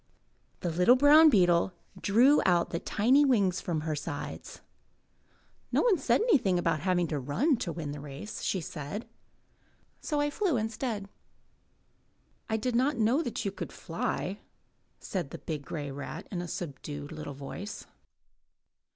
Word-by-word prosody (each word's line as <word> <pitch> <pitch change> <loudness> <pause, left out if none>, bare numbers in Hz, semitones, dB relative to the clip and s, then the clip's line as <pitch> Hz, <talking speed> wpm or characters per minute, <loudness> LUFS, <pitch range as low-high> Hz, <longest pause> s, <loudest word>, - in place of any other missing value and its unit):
The 175 - -1
little 180 +9 +5
brown 295 +4 +7
beetle 180 - +3 0.3
drew 250 +8 +5
out 175 -2 +2
the 170 - -1
tiny 255 +12 +3
wings 200 -10 +2
from 165 -3 -2
her 155 0 -2
sides. 145 0 -6 1.1
"Nobody 440 -7 +3
said - - +3
anything 270 - +3
about 165 -3 +1
having 175 +1 +1
to 150 - -1
run 205 - +1
to 175 - -3
win 155 -3 -5
the 145 - -6
race," 145 +7 -7
she - - 0
replied, 155 +8 -6 0.9
"so 300 -2 -2
I 290 0 +1
flew 360 - +1
instead." 220 -1 -3 1.4
"I 220 - +1
did 235 +2 -2
not 270 +4 +2
know 235 +7 +3
that 240 -9 -4
you 200 - 0
could - - -7
fly," 185 +3 -3 0.6
said 180 -8 -4
the - - -7
big 150 -3 -5
grey 145 -3 -5
rat 140 +1 -7
in 180 -3 -3
a 175 - -5
subdued 145 -3 -6
little 155 -3 -7
voice. 165 +10 -7
185 Hz, 150 wpm, -29 LUFS, 155-245 Hz, 1.4 s, brown